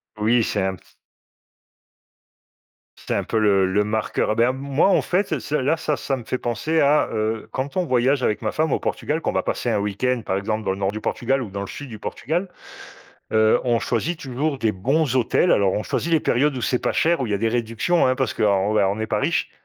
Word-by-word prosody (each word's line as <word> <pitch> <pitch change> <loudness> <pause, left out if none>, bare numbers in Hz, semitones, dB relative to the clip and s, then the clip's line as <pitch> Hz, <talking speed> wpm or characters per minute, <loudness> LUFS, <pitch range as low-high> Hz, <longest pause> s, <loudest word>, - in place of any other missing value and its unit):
Oui, 110 +2 +2
c'est 105 - -1
un 95 0 -1
p - - -21 2.2
C'est - - -2
un - - 0
peu 115 - -2
le 100 -3 +3
le 105 +2 +2
marqueur. 110 +1 -1
Ah, - - 0
ben, 120 +2 +3
moi, 140 +5 +1
en - - +4
fait, 185 +3 0
ça 155 - -2
ça, 145 +6 -2
là, 145 +5 +1
ça 155 -2 -1
ça 135 -1 -2
me 120 - -8
fait 130 - -3
penser 155 +7 -1
à, 145 +2 +4
heu, 110 0 -2
quand 140 +7 -4
on 180 - +1
voyage 130 0 +2
avec 105 - 0
ma 110 -2 -1
femme 155 -2 0
au - - +1
Portugal, 155 +2 -2
qu'on - - -1
va - - -1
passer 120 - -2
un 110 - +1
week-end, 115 +5 -1
par 95 - -1
exemple, 110 +2 -3
dans - - +1
le 95 - -3
nord 100 0 0
du 110 - -5
Portugal 130 +4 -1
ou 105 - -7
dans 100 - -4
le 100 - -5
sud 145 -2 -8
du 110 -3 -9
Portugal, 175 - -3 0.8
heu, 110 0 +4
on 120 -2 +2
choisit 155 +8 -2
toujours 140 +2 -2
des 110 -4 +1
bons 130 +8 0
hôtels. 130 +8 +3
Alors, 100 -2 +3
on 105 - -1
choisit 170 - -2
les 160 - +4
périodes 140 +3 +1
où - - -3
c'est 125 - +1
pas - - -1
cher 170 -2 +2
où 125 - -1
il - - -5
y 105 - +1
a - - -1
des 115 +2 +1
réductions, 115 +7 +1
hein, 130 - +2
parce 130 -3 -1
qu'on - - 0
on 100 +1 +2
on 100 +1 +1
n'est 110 0 -3
pas - - -1
riches - - 0
120 Hz, 245 wpm, -22 LUFS, 105-140 Hz, 2.2 s, en